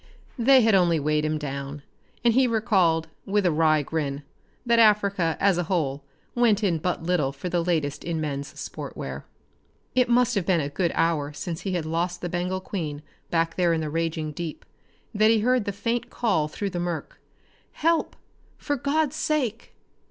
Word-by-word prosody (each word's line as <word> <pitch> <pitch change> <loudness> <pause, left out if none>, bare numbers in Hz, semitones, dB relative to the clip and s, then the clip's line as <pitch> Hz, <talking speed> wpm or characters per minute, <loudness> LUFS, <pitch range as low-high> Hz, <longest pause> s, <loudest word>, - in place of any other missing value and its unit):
They 260 +2 +6
had 220 -1 +4
only 175 -4 +4
weighed 150 +1 +1
him 155 0 0
down, 140 0 -5 0.4
and 235 -1 +4
he 260 +1 +4
recalled, 190 -8 +2 0.2
with 205 0 +1
a 175 - +4
wry 155 -1 +3
grin, 145 -2 -3 0.4
that 235 -1 +3
Africa 200 -6 +3
as 195 -3 +3
a 175 - -1
whole 145 -6 -1 0.3
went 225 -3 +3
in 175 -5 +1
but 175 0 -2
little 165 -6 +1
for 140 +6 -6
the 175 -1 0
latest 155 -5 -1
in 170 -2 -2
men's 140 -2 -4
sport - - -7
wear. 65 0 -6 0.7
It 250 -1 +3
must 245 0 +3
have 200 -5 0
been 185 -3 +3
a 140 -2 -2
good 170 +3 0
hour 150 -3 +1
since 165 +3 -5
he 190 - -3
had 170 -3 -1
lost 175 +2 -2
the 175 - -3
Bengal 180 +2 -2
Queen 155 -7 -5 0.3
back 165 -1 0
there 175 -2 +3
in 160 - 0
the 155 -1 -3
raging 160 -1 -2
deep, 160 +1 -6 0.5
that 215 +1 +4
he 225 -1 +4
heard 250 -1 +2
the 200 - -1
faint 230 +4 -2
call 195 -11 0
through 195 +6 -4
the 175 - -3
murk. 175 -2 -4 0.5
"Help, 330 +1 +1 0.4
for 290 -1 -2
God's 290 +2 0
sake!" 255 -9 -2
175 Hz, 185 wpm, -25 LUFS, 155-215 Hz, 0.7 s, They